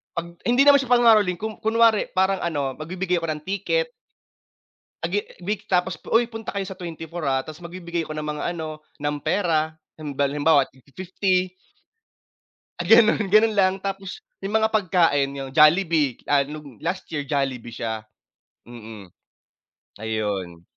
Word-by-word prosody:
'Pag 170 0 -5
hindi 245 +3 +4
naman 285 0 +8
siya 260 -3 +1
pangangaroling 215 -6 +4
kum 220 0 -4
kunwari 225 -1 +3
parang 190 +1 +2
ano 145 -6 -2
magbibigay 180 +3 -2
ako 165 -1 -3
ng 150 - -9
ticket. 480 - 0 1.1
A 165 - -2
ge 205 - +2 0.3
week 210 +2 -3
tapos 180 -2 +1
uy 235 +1 +4
punta 225 -1 -6
kayo 200 - -1
sa 190 0 -9
24, 170 -1 -7
ah, 135 -1 +1
tas 155 +1 -10
magbibigay 170 -1 -5
ako 155 - -6
ng 155 - -3
mga 150 0 -4
ano 155 -2 -6 0.2
ng 145 0 -2
pera, 160 -5 0 0.2
halim 150 -2 -6
halimbawa 145 +1 +3
tig 130 - -23
fi-fifty. 185 +2 -1 1.3
Ah - - -5
ganun, 220 -2 +5
ganun 215 +2 +5
lang 190 -2 +3
tapos 195 -1 -5 0.2
yung 200 +3 0
mga 220 0 +2
pagkain 170 -9 +2
yung 135 -1 -6
Jollibee, 155 -3 +4
ah, 145 -1 +3
nung 145 -4 -8
last 185 +2 -3
year 150 - -1
Jollibee 135 -4 -2
siya, 110 -1 -4 0.6
mm. 110 -5 -11 0.9
Ayon. 100 -6 -3
170 Hz, 155 wpm, -23 LUFS, 145-195 Hz, 1.3 s, naman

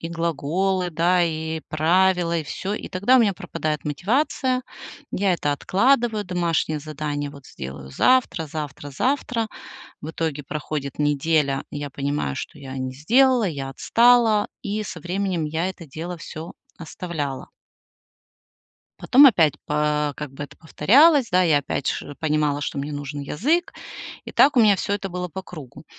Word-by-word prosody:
и 165 - -5
глаголы, 170 +3 -1
да, 175 +2 +2
и 160 -1 -2
правила, 170 +2 +2
и 160 - -2
всё. 195 +7 -4
И - - -6
тогда 200 +8 +3
у - - +6
меня 210 -3 +3
пропадает 155 -5 -4
мотивация. 255 - 0 0.5
Я 195 -1 +1
это 145 -4 0
откладываю, 220 - +1
домашнее 170 -4 -1
задание, 145 -1 -4
вот 140 -2 -14
сделаю 65 0 -8
завтра 255 - +2
завтра 145 -1 -6
завтра. 240 - -1 0.5
В 155 +2 -6
итоге 155 -3 -3
проходит 150 -1 -5
неделя, 145 -1 +1
я 145 -1 -5
понимаю, 140 - -2
что - - -7
я 135 -1 -8
не 130 0 -4
сделала, 245 - +3
я 140 -6 -4
отстала, 230 - +4
и 210 +1 -3
со 170 -4 -7
временем 180 -1 -2
я 160 +4 -1
это 175 -3 -9
дело 165 +5 -6
всё 160 +1 -8 0.2
оставляла. 160 -5 -5 1.5
Потом 275 +3 +6
опять 165 - +4
по 150 0 0
как 150 -3 -6
бы 140 +2 -7
это 140 0 -15
повторялось, 275 - +4
да, 185 0 +5
я 155 -4 +4
опять 140 -1 -3
ши 145 - -3
понимала, 150 -2 +1
что 145 - -4
мне 145 +2 -3
нужен 145 0 -5
язык, 290 - 0 0.5
и - - -7
так 280 0 +5
у 240 - +7
меня 210 -3 +5
всё 200 - -2
это 200 -1 -2
было 180 0 -4
по 190 +3 -7
кругу. 150 -10 -11
165 Hz, 155 wpm, -23 LUFS, 145-200 Hz, 1.5 s, у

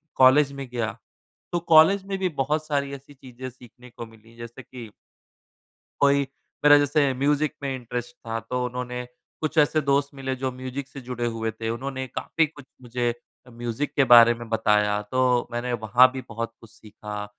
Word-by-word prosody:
College 135 +2 +5
में 140 -1 -7
गया, 115 -2 -3 0.5
तो 175 - 0
कॉलेज 165 +5 +6
में 195 0 -3
भी 185 -1 0
बहुत 150 +3 0
सारी 140 -2 -1
ऐसी 140 +1 -11
चीज़ें 130 -1 -9
सीखने 125 0 -16
को 115 0 -9
मिली, 115 0 -19
जैसे 115 +2 -9
कि 120 -2 -10 1.1
कोई 140 0 +4 0.4
मेरा 145 0 +9
जैसे 145 -1 +2
म्यूज़िक 145 +3 +1
में 135 -1 -2
इंटरेस्ट 120 -1 -6
था, 115 0 -2
तो 125 +3 -3
उन्होंने 125 0 -5 0.4
कुछ 155 +1 -3
ऐसे 155 +1 +4
दोस्त 140 -1 +1
मिले, 135 -1 -3
जो 130 0 -2
म्यूज़िक 130 +2 -6
से 140 - -10
जुड़े 120 -1 -4
हुए 115 -1 -2
थे। 110 +1 -6
उन्होंने 130 +3 -4
काफ़ी 160 +5 -1
कुछ 145 -2 -14 0.2
मुझे 120 -1 -2 0.4
म्यूज़िक 120 +4 -4
के 135 - +5
बारे 120 0 +8
में 120 0 -9
बताया, 105 -2 +2
तो 125 +3 +1
मैंने 120 +1 -2
वहाँ 120 +3 +4
भी 130 - -5
बहुत 115 0 -5
कुछ 115 - -16
सीखा। 105 -2 -8
125 Hz, 175 wpm, -24 LUFS, 115-140 Hz, 1.1 s, मेरा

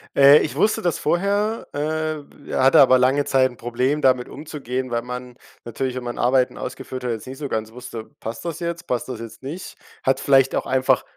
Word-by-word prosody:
Äh, 140 +2 +8
ich - - -2
wusste 215 +1 +2
das 175 -3 0
vorher, 200 +7 0
äh, 155 -1 -4
hatte 130 0 +5
aber 130 -1 +7
lange 135 +3 +2
Zeit 130 -1 +3
'n 120 - -16
Problem, 125 +5 -1
damit 130 -2 +2
umzugehen, 135 -4 -5
weil 120 0 0
man 125 0 -7 0.3
natürlich, 125 +2 -3
wenn 130 - -4
man 120 0 -5
Arbeiten 125 +1 +2
ausgeführt 130 0 -6
hat, 125 - -1
jetzt 110 +2 -5
nicht 130 +1 -7
so 145 -2 -5
ganz 110 0 -3
wusste: 120 -2 -8
„Passt 115 +7 -6
das 170 -1 -4
jetzt, 170 0 -4
passt 125 +1 -2
das 120 -3 -5
jetzt 115 +3 -10
nicht, 160 +8 -7 0.3
hat 135 - +2
vielleicht 135 -1 +4
auch - - -1
einfach 130 0 +2
130 Hz, 205 wpm, -22 LUFS, 125-150 Hz, 0.3 s, Äh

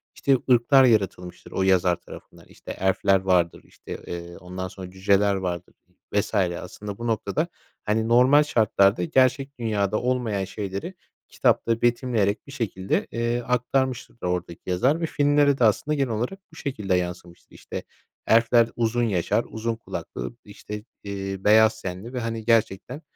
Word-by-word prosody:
işte, 135 -1 +3
ırklar 125 +3 +6
yaratılmıştır 95 -7 0
o 95 - 0
yazar 90 -2 +3
tarafından. - - -14
İşte, - - -10
elf'ler 95 0 +3
vardır, 90 -3 +1
işte, - - -9
eee, 85 0 -7
ondan 90 +1 -6
sonra 95 0 -9
cüceler 100 +1 +2
vardır 90 -3 -4 0.4
vs. - - 0
aslında 95 +2 -2
bu 120 - -4
noktada, 120 +8 -1 0.4
hani, 110 +1 +1
normal 125 +5 +6
şartlarda 100 -8 +3
gerçek 130 +6 +1
dünyada 105 -3 0
olmayan 120 -6 -1
şeyleri, 100 - -5 0.4
kitapta 115 0 +1
betimleyerek 120 -4 +1
bir - - -10
şekilde, 100 -8 -2
eee, 120 +1 -1
aktarmıştır 125 +1 -1
oradaki 90 -1 -3
yazar 130 - +2
ve - - +1
filmlere 145 -2 +3
de 125 - +1
aslında 115 +7 +2
genel 135 -3 0
olarak 120 - -3
bu - - -16
şekilde 105 - -2
yansımıştır. 90 -1 -5
İşte, - - -7 0.4
elfler 115 0 +4
uzun 120 +1 +1
yaşar, 95 -7 0
uzun 115 +1 -3
kulaklıdır, 115 +1 -6
işte, 105 0 -8 0.2
eee, 95 -1 -4
beyaz 110 +1 +5
tenli 95 +7 -6
ve, 125 - -2
hani, 115 -1 -4
gerçekten, 115 +4 +1
110 Hz, 145 wpm, -24 LUFS, 95-125 Hz, 0.4 s, ırklar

